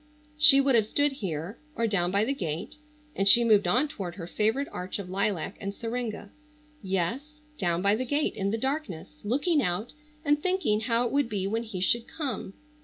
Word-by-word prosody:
She 300 -2 +8
would 275 -1 +3
have 220 -3 +3
stood 290 +5 +2
here, 185 - -5 0.2
or 230 - 0
down 190 -5 +1
by 200 +3 +1
the 275 - 0
gate—and 290 - -5
she 235 +4 +9
moved 215 -3 +4
on 265 +5 +3
toward 185 -10 -6
her 175 -4 -7
favorite 220 +10 0
arch 180 +1 -5
of 190 -3 -7
lilac 195 -2 -1
and 200 0 -4
syringa—yes, 250 - -5 0.2
down 175 -2 0
by 200 +1 +4
the 255 +3 -2
gate 290 +4 0
in 195 -2 -2
the 220 - -1
darkness 225 - -4
looking 290 - +1
out 180 +3 -2 0.3
and 295 0 +2
thinking 365 - +1
how 230 +2 +1
it 235 - -2
would 280 -3 +1
be 200 -3 -2
when 220 +3 -1
he 215 -5 -6
should 235 +5 +1
come. 255 -10 -5
225 Hz, 185 wpm, -27 LUFS, 195-285 Hz, 0.3 s, she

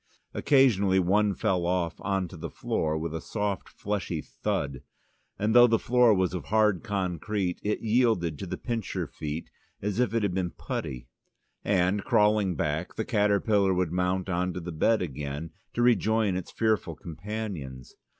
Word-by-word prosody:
Occasionally 105 -9 +4
one 100 +2 +2
fell 95 -5 0
off 90 -2 0
on 95 -2 -1
to - - -10
the 80 - -6
floor, 80 0 -1
with 80 0 -3
a 80 - -4
soft 105 0 -3
fleshy 95 -5 -3
thud, 70 -3 -3 0.6
and 105 +2 +1
though 120 0 +8
the 115 -1 +3
floor 125 +1 +4
was 95 -3 +2
of 90 - -4
hard 105 -3 +2
concrete, 95 -2 -2
it 105 +1 -1
yielded 110 - +1
to 95 - -5
the 90 +1 -4
pincerfeet 85 - -4 0.3
as 105 +2 -2
if 125 -2 +1
it 115 - +1
had 100 -3 0
been 90 -1 -1
putty, - - -5 0.6
and, 95 +1 +1
crawling 105 -3 +3
back, 80 +4 -2
the 110 - -2
caterpillar 100 -2 +2
would 90 -3 0
mount 90 +1 0
on 90 0 -1
to 90 - -4
the 90 0 -6
bed 100 +7 +2
again, 75 +1 -5 0.2
to 120 - +2
rejoin 110 -4 +3
its 95 - -4
fearful 110 -2 0
companions. 85 - -6
95 Hz, 160 wpm, -28 LUFS, 85-105 Hz, 0.6 s, though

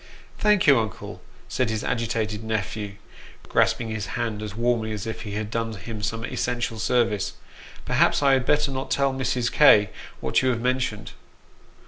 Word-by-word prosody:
" - - -25
Thank 210 -3 +3
you, 140 -4 +6
uncle," 110 -3 -5 0.3
said 130 -3 0
his 110 -1 -2
agitated 110 -2 -2
nephew, 105 -1 -3 0.5
grasping 115 -2 +1
his 110 -3 -3
hand 115 -3 -2
as 105 -2 -6
warmly 115 -1 0
as 105 -2 -5
if 110 -1 -5
he 105 -2 -6
had 105 +1 -4
done 115 -1 -2
him 105 +2 -7
some 115 +2 -2
essential 120 -1 -2
service. 115 -3 +1 0.3
" - - -17
Perhaps - - +2
I 140 -1 +5
had 130 -1 +3
better 150 +2 +2
not 130 0 -4
tell 140 -1 +1
Mrs. 125 -2 -1
K. 105 -9 +6 0.3
what 65 - +1
you 130 - +2
have 120 -2 0
mentioned." 125 -4 -1
115 Hz, 175 wpm, -24 LUFS, 110-125 Hz, 0.5 s, you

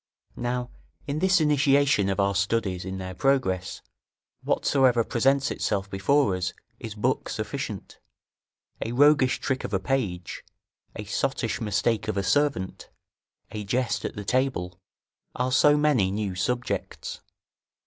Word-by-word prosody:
Now 120 0 -2 0.3
in 145 +1 -2
this 190 +1 +4
initiation 140 -7 +3
of 95 - -1
our 100 0 +2
studies 100 -3 -1
in 95 0 -4
their 95 0 -6
progress, 95 -6 0 0.6
whatsoever 130 -4 +3
presents 135 +5 +1
itself 100 -1 -2
before 100 +2 +2
us 90 0 -2 0.3
is 110 -3 -7
book 125 +5 -1
sufficient; 110 -1 -5 0.8
a 115 - -4
roguish 145 -1 +4
trick 130 -1 -2
of 100 - -2
a - - +1
page, 95 -8 -2 0.5
a - - -5
sottish - - -1
mistake 110 +1 0
of - - -2
a 100 - 0
servant, 140 -6 0 0.6
a 105 - -5
jest 125 +4 -1
at - - -4
the 105 -2 -6
table, 100 -9 -1 0.6
are 125 +1 -1
so 145 +3 +5
many 145 -10 +3
new 100 -1 -2
subjects. 125 +7 -3
115 Hz, 135 wpm, -26 LUFS, 95-135 Hz, 0.8 s, so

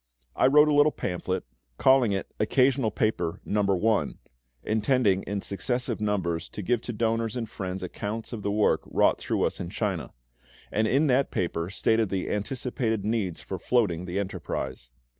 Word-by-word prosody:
I - - +4
wrote 150 +3 +6
a 150 - +3
little 145 +1 +5
pamphlet, 95 -3 -3 0.3
calling 130 -4 +5
it 95 -1 -3
"Occasional 130 +2 +3
Paper, 90 -6 -1
No. 105 0 +1 0.3
I." 110 -2 +2 0.5
(intending 110 -2 +2
in 100 +1 -3
successive 120 +2 -2
numbers 90 -6 -1
to 105 - -6
give 120 +4 +1
to 120 - -5
donors 115 0 0
and 120 -2 -3
friends 95 -3 -5
accounts 105 +5 -5
of 110 - -5
the 100 - -2
work 105 +1 +2
wrought - - +3
through - - -1
us - - -1
in 85 - -4
China), 95 -5 -2 0.6
and 110 +1 +1
in 140 +7 +3
that 135 -1 +3
paper 85 -1 -2
stated 110 +2 +1
the 95 -1 -2
anticipated 110 0 -2
needs 105 -6 -1
for 95 - -6
floating 90 -5 +1
the 90 +1 -4
enterprise. 65 -10 -4
105 Hz, 165 wpm, -27 LUFS, 95-120 Hz, 0.6 s, wrote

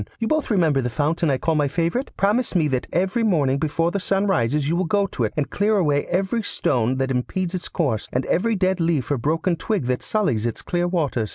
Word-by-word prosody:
You 225 - -2
both 310 +1 0
remember 165 - +2
the 125 - -2
fountain 155 +5 0
I 135 - +2
call 160 +4 0
my 150 -2 +2
favourite? 170 - -1
Promise 210 +3 +1
me 160 -4 +3
that 130 -2 -1
every 190 +7 0
morning 145 -11 +2
before 165 +3 0
the 200 - -1
sun 195 +1 0
rises 145 - +1
you 165 - +1
will 185 +2 0
go 200 +4 +2
to 125 -11 -2
it 105 - -4
and 145 -1 0
clear 210 +1 +2
away 145 -6 +1
every 190 +6 0
stone 125 - 0
that 135 0 -1
impedes 170 +8 -2
its 185 - -5
course, 130 - -1
and 125 +1 -1
every 225 +6 +1
dead 190 -1 +1
leaf 165 -5 0
or 140 - +1
broken 165 +6 0
twig 190 - -2
that 125 0 -1
sullies 130 - 0
its 115 - -5
clear 175 0 0
waters. 145 - -1
165 Hz, 235 wpm, -22 LUFS, 135-190 Hz, -, me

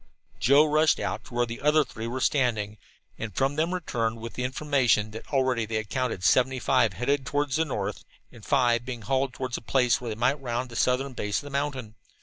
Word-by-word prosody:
Joe 140 +4 +5
rushed 155 +1 +3
out - - -3
to 120 - -11
where 120 0 +2
the 115 0 -7
other 150 +1 +4
three 110 +1 -7
were 125 +2 -3
standing, 110 -8 0 0.4
and 110 -4 -5
from 135 +1 +1
them 160 +3 0
returned 115 -11 -2
with 115 0 -7
the 125 - -4
information 125 -6 +1
that 110 - -10
already 130 -5 +1
they 110 - -4
had 110 -2 -3
counted 125 -6 -2
seven 130 +5 +3
headed 125 +2 +1
toward 145 +2 -1
the 160 +4 +1
north, 105 -9 -4 0.3
and 115 - -15
five 120 -3 +2
being 120 -3 -6
hauled 135 +2 0
toward 130 -1 -4
a - - -21
place 125 0 +2
where 120 - -4
they 110 - -3
might 130 +5 +1
round 125 0 -3
the - - -9
southern 130 +3 +1
base 105 -4 -2
of - - -3
the 145 - -9
mountain. 135 -5 -3
125 Hz, 215 wpm, -27 LUFS, 115-140 Hz, 0.4 s, Joe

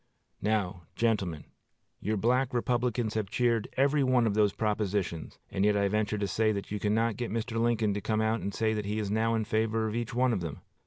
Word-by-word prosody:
Now, 95 -5 -1
gentlemen, 100 -9 0 0.6
your 110 +2 -1
Black 125 +4 +1
Republicans 120 -2 0
have 110 -3 -2
cheered 115 -1 +1
every 140 +2 +3
one 130 -2 +3
of 110 - +1
those 105 -1 +3
propositions, 105 -6 -2
and 95 - 0
yet 105 0 +3
I 100 0 +2
venture 105 0 0
to 100 -1 -1
say 110 +4 +2
that 100 -1 -5
you 105 - -2
cannot 110 +2 +1
get 120 -1 -3
Mr. 115 +1 -2
Lincoln 115 -3 +2
to 100 - -3
come 110 +1 0
out 110 +1 +1
and 100 - -3
say 110 +1 0
that 105 -1 -2
he 105 +2 -2
is 105 -2 -2
now 115 +1 +2
in 110 -1 0
favor 110 +1 0
of 110 - -3
each 120 +1 -3
one 125 0 +3
of 100 - -1
them. 80 -4 -5
110 Hz, 220 wpm, -29 LUFS, 105-115 Hz, 0.6 s, every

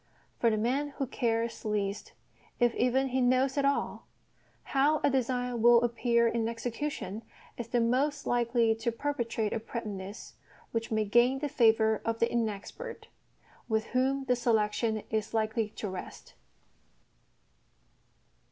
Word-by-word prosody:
For 235 - +4
the 215 - +1
man 255 +7 0
who 275 - 0
cares 230 -2 -1
least, 205 -2 -2 0.5
if 240 -1 +3
even 260 +2 +1
he 260 +1 0
knows 255 +2 +3
at 280 -1 +1
all, 280 0 -1 0.6
how 290 +3 +2
a 285 - +4
design 250 -2 -1
will 240 0 +6
appear 235 0 +2
in 230 -1 0
execution 230 -3 -4 0.3
is 240 - -6
the 240 +1 +1
most 280 +5 +1
likely 235 -1 +2
to 225 +1 -2
perpetrate 230 -4 -2
a - - -1
prettiness 210 -3 -7 0.4
which 230 0 -2
may 220 -1 +1
gain 240 +5 +4
the 290 +1 -3
favour 220 -4 +3
of 230 0 -1
the 230 - +3
inexpert, 240 - -4 0.6
with 220 0 +1
whom 265 +2 +1
the 250 -1 +2
selection 220 -2 +1
is 220 0 -2
likely 220 0 0
to 210 - -6
rest. 185 -1 -8
235 Hz, 140 wpm, -30 LUFS, 220-255 Hz, 0.6 s, will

